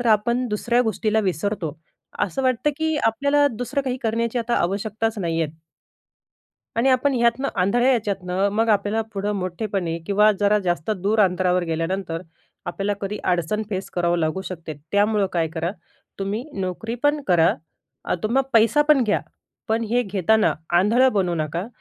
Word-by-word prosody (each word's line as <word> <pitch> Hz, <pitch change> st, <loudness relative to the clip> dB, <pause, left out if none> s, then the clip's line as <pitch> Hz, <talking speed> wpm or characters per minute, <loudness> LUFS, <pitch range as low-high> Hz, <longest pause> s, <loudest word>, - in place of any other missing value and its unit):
तर 245 Hz, -, -2 dB
आपण 235 Hz, +3 st, +2 dB
दुसऱ्या 235 Hz, +3 st, +1 dB
गोष्टीला 220 Hz, +1 st, 0 dB
विसरतो. 185 Hz, -4 st, -2 dB, 0.4 s
असं 205 Hz, +8 st, -1 dB
वाटतं, 255 Hz, +3 st, +1 dB
की 315 Hz, 0 st, 0 dB
आपल्याला 280 Hz, +5 st, +3 dB
दुसरं 245 Hz, +4 st, -3 dB
काही 255 Hz, -2 st, -2 dB
करण्याची 230 Hz, +1 st, 0 dB
आता 235 Hz, 0 st, -1 dB
आवश्यकताच 215 Hz, +4 st, -1 dB
नाही 165 Hz, -3 st, -1 dB
आहेत. 155 Hz, 0 st, -4 dB, 1.2 s
आणि 235 Hz, +4 st, +3 dB
आपण 260 Hz, +2 st, +2 dB
ह्यातनं 240 Hz, +3 st, +2 dB
आंधळ्या 240 Hz, +8 st, +2 dB
याच्यातनं, 195 Hz, -4 st, 0 dB
मग 225 Hz, +2 st, +1 dB
आपल्याला 210 Hz, +1 st, +2 dB
पुढं 200 Hz, +1 st, -2 dB
मोठेपणी 185 Hz, -2 st, -3 dB
किंवा 210 Hz, +2 st, +4 dB
जरा 205 Hz, +1 st, +4 dB
जास्त 175 Hz, +1 st, -1 dB
दूर 210 Hz, +2 st, +1 dB
अंतरावर 180 Hz, -2 st, +2 dB
गेल्यानंतर, 165 Hz, +1 st, -2 dB, 0.4 s
आपल्याला 195 Hz, +3 st, -2 dB
कधी 200 Hz, +1 st, -3 dB
अडचण 180 Hz, +5 st, -1 dB
फेस 190 Hz, -1 st, -4 dB
करावं 175 Hz, -1 st, 0 dB
लागू 160 Hz, +4 st, -1 dB
शकते. 165 Hz, -4 st, -6 dB, 0.2 s
त्यामुळं 205 Hz, 0 st, +3 dB
काय 165 Hz, -2 st, +1 dB
करा, 165 Hz, +1 st, -3 dB, 0.5 s
तुम्ही 200 Hz, +4 st, -2 dB, 0.2 s
नोकरीपण 235 Hz, -, -1 dB
करा, 170 Hz, -2 st, +4 dB, 0.5 s
अ, -, -, 0 dB
तुम्ही 245 Hz, +5 st, +2 dB
पैसा 230 Hz, +6 st, +5 dB
पण 295 Hz, -4 st, +6 dB
घ्या. 210 Hz, -, +1 dB, 0.5 s
पण 225 Hz, +1 st, +1 dB
हे 245 Hz, +1 st, +3 dB
घेताना 210 Hz, +1 st, +2 dB, 0.3 s
आंधळं 245 Hz, +7 st, +4 dB
बनू 185 Hz, -4 st, +1 dB
नका. 165 Hz, +5 st, -2 dB
210 Hz, 150 wpm, -23 LUFS, 180-235 Hz, 1.2 s, पण